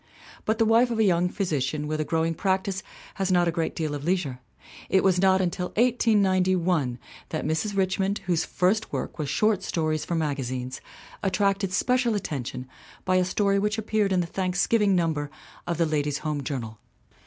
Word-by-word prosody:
But 220 +1 +1
the 225 - +3
wife 230 +3 +4
of 230 - -2
a 220 - +4
young 180 -2 +3
physician 150 -6 -1
with 155 +1 -2
a - - +1
growing 165 +1 0
practice 190 +1 -1 0.4
has 190 -1 +1
not 175 -1 +3
a - - +2
great 165 -1 -2
deal 155 -2 -2
of 145 -1 -5
leisure. 165 -7 -1 0.5
It 190 - +3
was 185 -2 +3
not 190 0 +4
until 180 0 -1
1891 185 - +2 0.3
that 155 - -3
Mrs. 160 +7 -1
Richmond, 190 +1 +1
whose 175 -3 +1
first 195 +5 0
work - - -4
was 145 -2 -2
short 210 +4 +2
stories 155 -4 -1
for 170 - -2
magazines, 130 -5 -3 0.4
attracted 195 0 +1
special 245 +3 +1
attention 130 - -4 0.4
by 185 0 +3
a 185 - +3
story 200 +2 +1
which 210 +2 0
appeared 215 -2 0
in 185 -1 +3
the - - -2
Thanksgiving 190 +3 +1
number 160 -4 0 0.4
of 170 -2 -1
the 165 - +3
Ladies' 150 -2 0
Home 150 -2 -1
Journal. 115 -6 -5
180 Hz, 175 wpm, -26 LUFS, 155-195 Hz, 0.5 s, wife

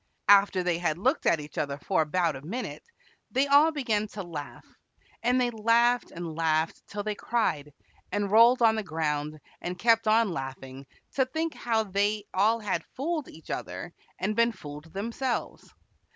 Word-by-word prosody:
After 200 -2 +6
they 175 -1 0
had 160 -3 0
looked 260 - +1
at 165 - +4
each 150 0 -7
other 140 -2 -2
for 170 +4 0
about 165 +1 0
a 135 - -8
minute 220 - -5 0.5
they 265 +2 +2
all 285 +3 +5
began 225 -8 -1
to 200 -1 -7
laugh, 155 -5 -8 0.6
and 250 +2 +2
they 245 -1 +1
laughed 235 +2 +2
and 170 -1 -6
laughed 160 0 0
till 205 0 -5
they 210 0 -2
cried, 165 -10 -1 0.4
and 205 -1 -1
rolled 235 +3 +6
on 225 -1 +6
the 220 - -1
ground 155 -4 -2 0.2
and 180 +1 -4
kept 225 +2 +3
on 220 -1 +4
laughing 135 -2 -7 0.3
to 265 -1 +2
think 315 +4 -2
how 225 -2 0
they 205 +1 0
all 215 +5 +3
had 190 -6 -1
fooled 305 +2 -2
each 160 - -11
other 170 - -5 0.2
and 210 +3 -1
been 235 +1 +3
fooled 150 -4 -10
themselves. 235 +5 -3
205 Hz, 170 wpm, -28 LUFS, 160-235 Hz, 0.6 s, After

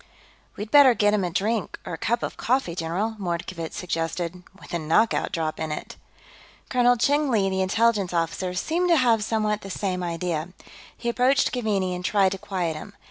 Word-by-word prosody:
"We'd 210 +2 -6
better 280 -4 +7
get 205 -1 +3
him 205 -2 +1
a 180 - 0
drink, 205 +3 -1
or - - -5
a - - -4
cup 235 +1 0
of - - -3
coffee, 250 -8 0
general," 185 +7 -2
Mordkovitz 170 -2 -4
suggested. 170 0 -3 0.2
"With - - -12
a 170 - 0
knockout 165 +9 +2
drop 160 -2 -2
in 155 - -3
it." - - -6 0.7
Colonel 245 -1 +4
Cheng 285 +4 +2
Li, 200 -5 +2
the 190 0 0
Intelligence 205 0 +2
officer, 175 +2 -1
seemed 345 - 0
to 335 - +5
have 235 -5 +3
somewhat 215 -1 0
the 195 - -8
same 185 -1 -2
idea. 170 -1 -3 0.4
He 235 - -6
approached 255 +3 +3
Keaveney 205 -7 0
and 180 0 -5
tried 195 0 +3
to 195 - -4
quiet 175 -5 -2
him. 200 +7 -9
195 Hz, 190 wpm, -25 LUFS, 175-230 Hz, 0.7 s, better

